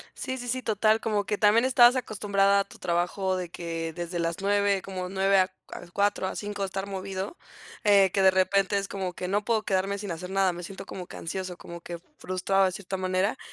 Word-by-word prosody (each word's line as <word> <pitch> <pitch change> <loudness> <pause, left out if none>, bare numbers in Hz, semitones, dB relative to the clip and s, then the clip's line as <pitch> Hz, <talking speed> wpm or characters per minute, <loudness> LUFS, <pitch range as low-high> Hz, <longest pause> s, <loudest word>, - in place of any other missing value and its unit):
Sí, 260 0 -4
sí, 245 - -6
sí, 255 +2 -1
total, 215 0 +2
como 210 -3 -1
que 205 0 -1
también 220 +4 +4
estabas 245 -1 +6
acostumbrada 200 -4 +2
a - - -1
tu - - -13
trabajo 185 +2 0
de 180 -2 -4
que 165 -1 -4
desde 175 +1 -4
las 170 0 -1
9, 200 -1 +2
como 185 -1 -5
9 195 0 +2
a 185 - +4
c 185 - -31 0.2
a - - -8
cuatro, 200 -1 +1
a - - -4
5, 205 -1 -3
estar 195 +1 -4
movido, 195 - -5 0.5
eh, 200 -3 +6
que 195 - +2
de 190 - +7
repente 190 +1 +2
es 195 - -4
como 190 -2 -4
que: 180 - -5
"No 205 +3 0
puedo 225 -1 +2
quedarme 195 0 0
sin 205 -2 -5
hacer 180 +3 -6
nada. 195 -1 +3
Me 175 0 -7
siento 190 +3 -8
como 180 -2 -7
que - - -10
ansioso, 185 +1 -4
como 170 -1 -9
que 170 -1 -7 0.2
frustrado 185 +1 +1
de 185 - +1
cierta 190 +1 -5
manera". 185 +2 0
195 Hz, 225 wpm, -27 LUFS, 185-205 Hz, 0.5 s, de